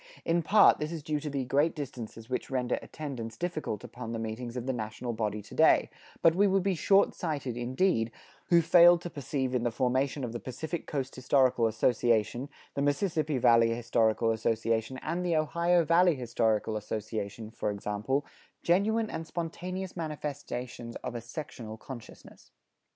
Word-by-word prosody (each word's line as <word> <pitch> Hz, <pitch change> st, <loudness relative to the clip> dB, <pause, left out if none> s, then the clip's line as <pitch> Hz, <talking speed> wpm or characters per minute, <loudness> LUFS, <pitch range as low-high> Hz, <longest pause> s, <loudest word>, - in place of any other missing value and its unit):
In 170 Hz, +1 st, +2 dB
part 205 Hz, +6 st, +6 dB
this 150 Hz, +1 st, -3 dB
is 165 Hz, -3 st, -5 dB
due 150 Hz, 0 st, -1 dB
to 150 Hz, -, -5 dB
the 135 Hz, -2 st, -2 dB
great 145 Hz, +6 st, +2 dB
distances 120 Hz, -6 st, -7 dB
which 125 Hz, 0 st, -3 dB
render 125 Hz, -2 st, 0 dB
attendance 120 Hz, -7 st, -6 dB
difficult 155 Hz, -, -3 dB
upon 115 Hz, -1 st, -7 dB
the -, -, -2 dB
meetings 115 Hz, +2 st, -5 dB
of 125 Hz, -, -4 dB
the 130 Hz, -, 0 dB
national 115 Hz, +1 st, -4 dB
body 105 Hz, -2 st, -2 dB
to -, -, -13 dB
day, -, -, +4 dB, 0.3 s
but 165 Hz, -, +7 dB
we 200 Hz, +4 st, +4 dB
would 195 Hz, -1 st, +2 dB
be 195 Hz, 0 st, +1 dB
short 195 Hz, +3 st, +3 dB
sighted, 145 Hz, -8 st, -3 dB
indeed, 120 Hz, 0 st, +1 dB, 0.4 s
who 170 Hz, -2 st, +5 dB
failed 175 Hz, +1 st, +7 dB
to 175 Hz, -, -6 dB
perceive 135 Hz, -3 st, -2 dB
in 125 Hz, -, +1 dB
the 120 Hz, -, +1 dB
formation 130 Hz, +4 st, 0 dB
of 120 Hz, -2 st, -4 dB
the 120 Hz, -, -4 dB
Pacific 160 Hz, +6 st, -5 dB
Coast 135 Hz, -2 st, -3 dB
Historical 130 Hz, -2 st, +3 dB
Association, 115 Hz, +2 st, +1 dB, 0.2 s
the 140 Hz, -, -2 dB
Mississippi 155 Hz, 0 st, 0 dB
Valley 115 Hz, -2 st, +5 dB
Historical 115 Hz, -1 st, +2 dB
Association, 115 Hz, +2 st, 0 dB
and 170 Hz, +3 st, -2 dB
the 175 Hz, -2 st, +1 dB
Ohio 170 Hz, +3 st, +2 dB
Valley 170 Hz, +1 st, +4 dB
Historical 115 Hz, -3 st, 0 dB
Association, 110 Hz, 0 st, -5 dB
for 110 Hz, -, -2 dB
example, 105 Hz, +7 st, -2 dB, 0.4 s
genuine 215 Hz, +6 st, +2 dB
and 160 Hz, 0 st, -5 dB
spontaneous 180 Hz, +3 st, -5 dB
manifestations 145 Hz, -7 st, -5 dB
of -, -, -4 dB
a 120 Hz, -, -4 dB
sectional 120 Hz, -3 st, -7 dB
consciousness. 120 Hz, 0 st, -12 dB
130 Hz, 165 wpm, -29 LUFS, 115-160 Hz, 0.4 s, but